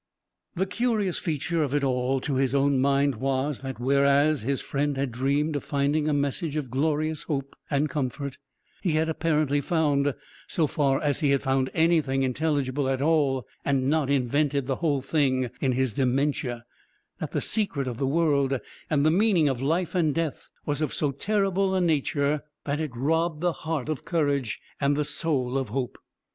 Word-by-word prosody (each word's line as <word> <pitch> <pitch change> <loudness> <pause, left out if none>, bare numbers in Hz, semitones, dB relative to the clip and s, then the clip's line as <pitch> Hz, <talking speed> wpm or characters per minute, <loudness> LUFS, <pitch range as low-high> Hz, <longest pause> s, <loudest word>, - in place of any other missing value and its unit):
The 190 +2 +1
curious 215 -3 0
feature 165 +1 -1
of 145 -2 0
it 145 - +1
all 130 0 +1
to 140 - -2
his 135 0 +1
own 140 -1 +3
mind 140 -1 +2
was, 135 +3 -1
that 135 -3 -6
whereas 140 +3 +3
his 135 +4 -1
friend 145 0 -1
had 135 -2 -1
dreamed 140 +5 0
of 145 - -2
finding 145 +2 0
a - - +2
message 145 +2 -1
of 140 -6 -3
glorious 155 +3 0
hope 140 -3 -4
and 145 +1 +1
comfort, 140 -1 -3 0.4
he 175 -5 0
had 160 +1 +1
apparently 150 -3 +1
found 145 -3 +1 0.3
(so 165 - +1
far 140 -2 +1
as 145 -2 +1
he 145 - +2
had 140 -1 +2
found 135 0 +1
anything 160 -5 +2
intelligible 140 0 0
at 135 -1 0
all, 140 -5 +2 0.2
and 135 -1 +1
not 155 -3 +1
invented 140 +1 +1
the 135 0 -1
whole 145 -5 0
thing 130 -4 +1
in 130 -2 +2
his 130 -2 0
dementia) 130 -1 0 0.5
that - - -3
the - - 0
secret 165 - -1
of 120 -2 -4
the 135 - +1
world, 140 -3 +2 0.3
and 145 -2 +2
the 155 - +5
meaning 185 -4 +3
of 130 -3 -1
life 165 +5 0
and 160 -6 +1
death, 165 -3 -3 0.2
was 145 0 -1
of 155 - -1
so 145 -2 0
terrible 195 +4 0
a - - +2
nature 150 -3 +1 0.2
that 145 +1 -1
it 155 -1 -2
robbed 160 +5 0
the 175 -1 +1
heart 160 -5 -3
of 155 -4 -3
courage 145 -8 0 0.2
and 140 0 +2
the 150 - 0
soul 135 -5 0
of 130 - -4
hope. 125 +2 -3
145 Hz, 180 wpm, -26 LUFS, 135-155 Hz, 0.5 s, the